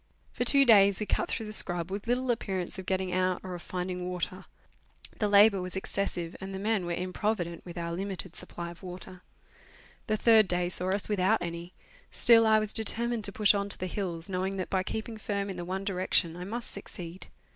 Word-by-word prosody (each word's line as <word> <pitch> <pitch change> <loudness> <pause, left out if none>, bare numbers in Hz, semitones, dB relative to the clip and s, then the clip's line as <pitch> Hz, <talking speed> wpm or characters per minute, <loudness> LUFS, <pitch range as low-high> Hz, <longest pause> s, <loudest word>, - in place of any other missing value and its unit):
For - - -1
two 275 +3 +5
days 200 -4 +6
we 215 - -2
cut - - -1
through 225 - -3
the 215 - -7
scrub, 175 -3 +1
with 200 +3 -5
little 250 +1 +1
appearance 190 -6 -3
of 190 - -8
getting 190 -1 -1
out 185 0 +1
or 185 -1 -6
of 175 - -7
finding 180 0 -4
water. 180 +1 -4 0.7
The 210 - +2
labour 205 -1 +6
was 180 0 -6
excessive, 190 -3 -3
and 190 0 -6
the - - -3
men 205 -2 0
were 175 - -1
improvident 180 -1 -2
with 175 0 -9
our 170 0 -3
limited 190 0 -5
supply 170 -1 -5
of 170 - -14
water. 185 0 -9 0.9
The 215 - +1
third 220 -2 +5
day 175 0 0
saw 180 +1 -1
us 195 +1 +2
without 205 +1 +2
any; 170 +1 -6 0.4
still 225 -1 +6
I 220 0 +6
was 215 -1 0
determined 230 0 +1
to 200 - +2
push 210 +1 +4
on 200 0 -1
to - - +2
the 185 - -4
hills, 175 -3 -3
knowing 190 +1 -2
that 185 - -4
by 190 - +2
keeping 220 +3 -5
firm 200 -2 -2
in - - -6
the 175 - -5
one 190 +2 -3
direction 180 -3 +1
I 180 +1 -6
must 235 +4 -4
succeed. 180 -2 -8
190 Hz, 210 wpm, -29 LUFS, 180-210 Hz, 0.9 s, days